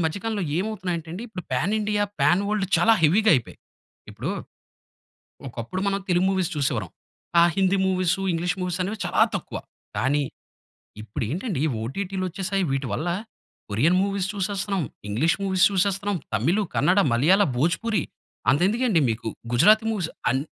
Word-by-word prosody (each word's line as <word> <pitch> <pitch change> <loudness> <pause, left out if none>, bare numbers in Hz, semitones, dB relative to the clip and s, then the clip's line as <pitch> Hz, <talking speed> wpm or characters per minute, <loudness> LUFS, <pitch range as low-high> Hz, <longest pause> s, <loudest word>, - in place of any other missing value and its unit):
మధ్య 160 +5 -1
కాలంలో 215 -4 -1 0.2
ఏమవుతున్నాయంటే 180 -6 -3
అండి, 190 - -6
ఇప్పుడు 185 -5 -7
పాన్ 170 +10 +1
ఇండియా, 210 0 0 0.2
పాన్ 185 +3 +4
వరల్డ్ 210 -2 0
చాలా 225 - +5
హెవీగా 205 +8 +5
అయిపోయాయి. 125 - -3 0.5
ఇప్పుడు, - - -4 1.2
ఒకప్పుడు 120 +10 -5
మనం 200 0 0
తెలుగు 180 +1 +3
మూవీస్ 185 -3 0
చూసేవరం. 125 - -1 0.5
ఆ - - +7
హిందీ 195 0 +3
మూవీసు, 185 0 +1
ఇంగ్లీష్ 175 +3 -1
మూవీసు 180 0 -2
అనేవి 210 +3 -4
చాలా - - +3
తక్కువ. - - -7 0.4
కానీ, 145 +3 +2 0.8
ఇప్పుడు 110 +4 -4
ఏంటండి 175 - -2 0.2
ఓటీటీలు 185 - -3
వచ్చేసాయి. 195 +1 -1
వీటి 135 -1 -1
వల్ల 160 +10 -2 0.6
Korean 150 - +3
movies 195 -1 -1
చూసేస్తున్నాం, 195 -1 -1 0.3
English 145 +12 +2
movies 190 -1 +3
చూసేస్తున్నాం, 195 0 0 0.2
Tamil, 165 - +2
Kannada, 185 +3 +3
మలయాళ, 180 - +4 0.2
భోజపూరి 175 - +1 0.5
అంత 140 - +2
ఎందుకండి 230 -5 +2
మీకు, 110 0 -3 0.2
గుజరాతి 210 - +5
మూవీస్ 185 -7 -2 0.2
అన్ 135 +1 +1
185 Hz, 145 wpm, -24 LUFS, 155-200 Hz, 1.2 s, ఆ